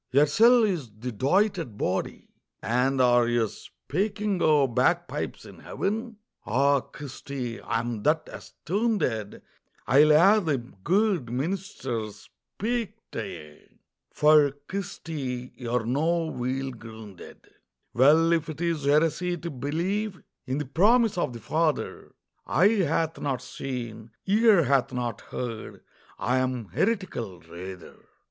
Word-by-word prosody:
Yersel' 215 - +5
is 165 - -3
the 125 +3 -5
doited 165 - 0
body. 95 -1 -2 0.4
"And 125 +3 +1
are 120 -1 +4
ye 120 -2 +2
speaking 200 - -3
o' 150 -3 +4
bagpipes 125 0 -1
in - - -13
Heaven? 225 +3 -3 0.3
Ah, 140 +7 +3
Christy, 130 -3 -7
I'm 115 -1 -2
that 155 +6 +2
astoonded 175 - -2 0.4
I'll 145 +3 +5
hae 185 +8 +6
the 155 -5 +1
guid 165 - 0
meenister 135 - -3
speak 220 - -5 0.2
tae - - -4
ye, 75 - -13 0.3
For, 150 -2 +4
Christy, 145 -10 -5
ye're 120 -2 -2
no 160 +7 +1
weel 135 -2 -3
groonded." 110 -5 -12 0.5
Well, 155 +7 +5
if 165 -1 0
it 155 - -7
is 165 -4 -1
heresy 165 +4 +2
to 170 0 -6
believe 180 - -2 0.3
In 130 +2 -1
the 150 - -2
promise 215 - +3
of 175 -7 -1
the 120 - -8
Father, 155 +7 -2 0.3
"Eye 190 +5 +4 0.2
hath 160 +1 -1
not 135 -3 -2
seen, 115 -4 -6 0.2
ear 210 -2 +5
hath 135 -1 +2
not 120 -2 -3
heard," 115 -3 -6 0.3
I 125 +2 +1
am 125 -5 -2
heretical, 120 - -2
rather. 90 +2 -10
140 Hz, 120 wpm, -26 LUFS, 120-175 Hz, 0.5 s, hae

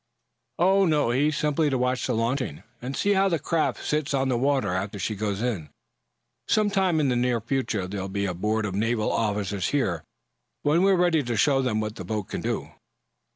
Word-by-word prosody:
"Oh, 190 +2 +4
no. 150 -7 +2
He's 145 +4 +1
simply 150 0 +1
to 135 - 0
watch 125 0 0
the 125 - 0
launching, 115 - -1 0.2
and 130 +3 -4
see 205 - +2
how 195 0 +3
the 170 - +1
craft 160 +2 -1
sits 150 -2 0
on 135 0 +1
the 125 - +1
water 135 -7 +1
after 100 +3 -3
she 100 +3 -2
goes 105 0 -2
in. 100 -12 -2 0.8
Some 210 -1 +2
time 185 -4 +2
in 145 -3 +2
the 125 - +1
near 120 -1 +1
future 115 -4 -1
there'll 95 0 -4
be 100 +1 -1
a 90 - -1
board 105 +5 -1
of 100 - -3
naval 110 +2 0
officers 100 -3 -1
here, 100 - 0 0.6
when 155 +4 +3
we're 195 0 +5
ready 175 -3 +3
to 120 -4 -2
show 135 +5 +3
them 115 -5 0
what 110 +1 -4
the - - -6
boat 105 -3 -4
can - - -4
do." - - -3
125 Hz, 205 wpm, -25 LUFS, 105-150 Hz, 0.8 s, we're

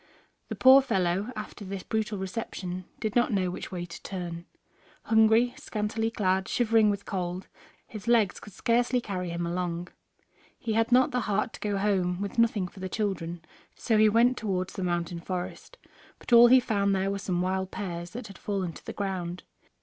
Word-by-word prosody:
The - - -3
poor 260 +1 +8
fellow, 195 -2 0
after 215 0 -7
this 195 -1 -6
brutal 215 -2 -2
reception, 185 -2 -5
did 215 -2 -3
not 240 0 +3
know 185 -3 +1
which - - -7
way 175 -2 -4
to 170 - -10
turn. 175 -3 -6 0.6
Hungry, 220 +2 +4
scantily 220 +1 -2
clad, 190 -3 0
shivering 225 -3 +3
with 200 0 -2
cold, 180 -1 -3 0.4
his 215 -1 -10
legs 225 -5 +3
could 210 - -13
scarcely 245 +4 +1
carry 185 -6 -4
him 170 0 -3
along. 175 0 -3 0.7
He 230 -4 -3
had 225 +2 +1
not 255 +1 +5
the 250 - 0
heart 215 +2 0
to - - -9
go 205 -1 -1
home, 185 -3 +1
with 200 +3 -3
nothing 220 -5 +2
for 190 - -14
the 190 0 -4
children, 175 -5 -3 0.3
so 225 - 0
he 215 0 +6
went 235 +4 +4
towards 185 -4 -2
the 190 - -4
mountain 175 -1 -2
forest. 180 - -6 0.4
But - - -4
all 235 0 +10
he 255 +2 +7
found 200 -5 +1
there 190 +1 0
were 200 - -3
some 180 -2 -1
wild 190 0 -1
pears 175 -5 -5
that 235 +5 -7
had 200 -3 -11
fallen 190 -5 -2
to - - -13
the - - -6
ground. 180 -3 -4
200 Hz, 190 wpm, -28 LUFS, 180-225 Hz, 0.7 s, all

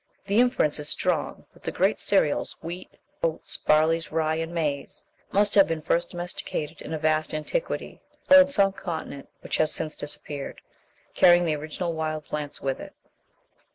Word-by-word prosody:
(Ibid.) - - -42
The 205 +3 +3
inference 245 - +2
is 150 0 -4
strong - - -1
that - - -20
the - - -3
great - - +1
cereals - - +2
wheat, 175 +3 -6 0.3
oats, 165 -1 -2
barley, 160 +2 +3
rye, 160 0 0
and 165 +1 -3
maize 150 -5 -3 0.3
must 205 +1 +3
have 195 -2 +7
been 160 -1 -3
first 170 +2 +1
domesticated 175 -3 -3
in - - -8
a 160 - -1
vast 155 0 0
antiquity, 155 - -3 0.3
or 280 - +11
in 280 0 +8
some 200 -8 +2
continent 160 -7 -6
which - - -2
has 155 - +4
since 155 -1 0
disappeared, 145 -1 -6 0.5
carrying 175 0 +6
the 155 -2 +1
original 155 +3 -4
wild 155 -1 -3
plants 150 -1 -5
with 135 -1 -2
it. - - -10
160 Hz, 170 wpm, -26 LUFS, 155-175 Hz, 0.5 s, or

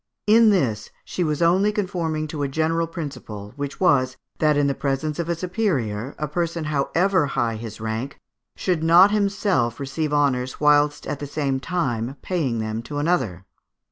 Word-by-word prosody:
In 225 +1 +6
this 125 - +1 0.2
she 180 - -2
was 155 0 0
only 190 +5 +4
conforming 175 -7 -2
to 150 -1 -4
a 140 - +1
general 160 +4 0
principle, 135 - -7
which 145 -1 -5
was, 130 -8 +3 0.2
that 150 -2 +3
in 145 - +3
the 140 - +1
presence 140 +3 -2
of 170 0 -2
a 170 - +1
superior, 150 - -2
a 150 - -2
person, 170 +1 -2
however 160 +4 +1
high 120 -4 -1
his 110 -1 -7
rank, 110 +5 -4 0.4
should 180 -4 -1
not 175 +5 +6
himself 195 - +1
receive 145 +3 -2
honours 130 -4 +1
whilst 150 0 +3
at 150 -2 -4
the 145 - -5
same 140 -2 -1
time 135 -7 -2
paying 150 -11 -1
them 110 0 -3
to 145 +5 -7
another. 130 - 0
150 Hz, 170 wpm, -23 LUFS, 130-170 Hz, 0.4 s, In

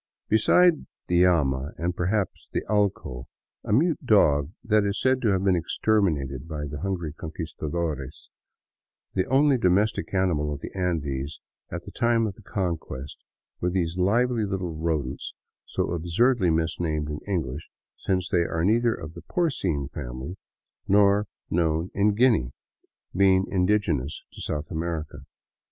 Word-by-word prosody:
Besides 170 +10 +5 0.3
the 90 +1 +4
llama, 70 -5 +1
and, 85 +1 -2
perhaps, 95 +3 -1
the - - -1
allco, 100 - -1 0.4
a - - -4
mute 160 +8 +2
dog 75 - +4
that 110 -3 +3
is 100 0 -1
said 130 0 +2
to 115 - +1
have 95 -2 +2
been 95 -2 +4
exterminated 80 -7 0
by 75 -2 -4
the 75 0 -6
hungry 90 -5 -2
Conquistadores, 80 -2 -5 0.8
the 95 - 0
only 135 0 +4
domestic 100 +2 +2
animal 85 -6 +1
of 70 -1 -5
the - - -8
Andes 75 -6 -2 0.3
at - - -5
the - - -10
time 115 -1 +2
of 105 - -3
the 105 - -17
Conquest 85 -9 -4 0.4
were 90 - 0
these 85 -2 -1
lively 115 +5 +2
little 95 -4 -2
rodents 80 -4 -3 0.3
so - - -2
absurdly 90 +5 +2
misnamed 80 -1 0
in 75 - -4
English, 80 -7 -3 0.3
since 95 -2 -1
they 85 - +2
are 85 0 -1
neither 115 +3 +3
of 80 +1 -8
the 85 - -10
porcine 90 - -1
family 65 +7 -6 0.5
nor 100 +1 +4 0.2
known 80 +1 +1
in 100 +1 +2
Guinea, 110 - +3 0.6
being 95 0 +4
in 90 -2 +2
digenous 80 -10 0
to - - -10
South 75 +2 -4
America. 80 -4 -4
90 Hz, 145 wpm, -26 LUFS, 75-105 Hz, 0.8 s, Besides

